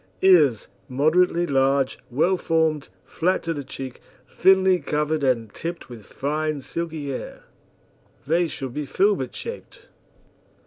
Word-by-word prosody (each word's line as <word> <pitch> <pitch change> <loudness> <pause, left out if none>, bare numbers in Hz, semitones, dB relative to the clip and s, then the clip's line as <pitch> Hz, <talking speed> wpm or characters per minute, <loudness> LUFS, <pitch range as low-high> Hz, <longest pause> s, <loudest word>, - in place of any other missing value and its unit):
EARS 155 - +5 0.2
Moderately 165 +6 +2
large, 135 -2 +1
well 160 +9 +2
formed, 160 - 0 0.2
flat 185 +3 0
to 165 - -2
the 145 -2 -5
cheek, 130 -1 -8 0.3
thinly 190 0 +4
covered 150 0 -1
and 115 -5 0
tipped 170 -3 -6
with 115 -4 -11
fine 155 +1 -2
silky 160 0 -5
hair. 130 - -7 0.8
They 170 +4 +2
should 135 -5 -6
be 150 0 -4
filbert 405 - +1
shaped. 470 +1 -9
155 Hz, 125 wpm, -23 LUFS, 135-175 Hz, 0.8 s, EARS